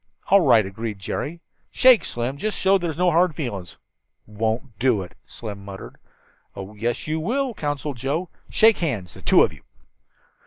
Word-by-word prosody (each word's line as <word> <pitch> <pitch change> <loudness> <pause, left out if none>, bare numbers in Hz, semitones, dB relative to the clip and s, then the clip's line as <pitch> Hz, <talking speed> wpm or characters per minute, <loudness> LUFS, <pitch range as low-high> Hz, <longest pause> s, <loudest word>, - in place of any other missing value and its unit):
"All 200 +1 +6
right," 110 - +5
agreed 105 +2 -5
Jerry. 150 - -5 0.3
"Shake, 255 -3 +5
Slim, 120 +3 -3
just 215 +8 -2
to - - -4
show 195 +1 +5
there's 170 -3 -3
no 180 0 +3
hard 170 -1 +3
feelings." 100 - -5 0.5
"Won't 110 +2 -3
do 120 -6 +2
it," 90 - -12
Slim 105 -3 -8
muttered. 100 -1 -9 0.6
"Oh, 100 +1 -8
yes, 115 +3 -3
you 155 +1 -1
will," 250 - -1
counseled 145 - -3
Joe. 150 +9 -2 0.2
"Shake 225 0 +4
hands, 115 - -3
the - - -13
two - - +5
of - - 0
you." - - -16
135 Hz, 170 wpm, -23 LUFS, 105-175 Hz, 0.6 s, All